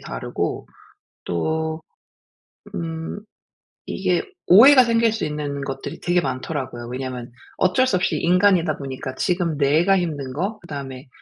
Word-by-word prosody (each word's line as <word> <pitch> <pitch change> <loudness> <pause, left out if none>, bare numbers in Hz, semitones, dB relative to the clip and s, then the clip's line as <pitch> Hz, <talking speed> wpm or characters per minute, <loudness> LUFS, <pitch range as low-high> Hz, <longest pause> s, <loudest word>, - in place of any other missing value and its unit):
다르고, - - -4 0.6
또 160 - -2 0.9
음 165 +2 -4 0.7
이게 - - 0 0.2
오해가 255 +7 +8
생길 230 -1 +2
수 220 - -2
있는 150 -2 -4
것들이 135 -1 -6
되게 175 0 +2
많더라고요. 130 -3 -4
왜냐하면 125 -1 -5 0.2
어쩔 185 +8 +3
수 210 - +1
없이 185 - 0
인간이다 180 -3 +3
보니까 130 -1 -6
지금 175 -2 0
내가 155 +7 +3
힘든 145 -7 -3
거 195 +8 -2
그다음에 135 -5 -8
160 Hz, 280 characters per minute, -22 LUFS, 135-180 Hz, 0.9 s, 오해가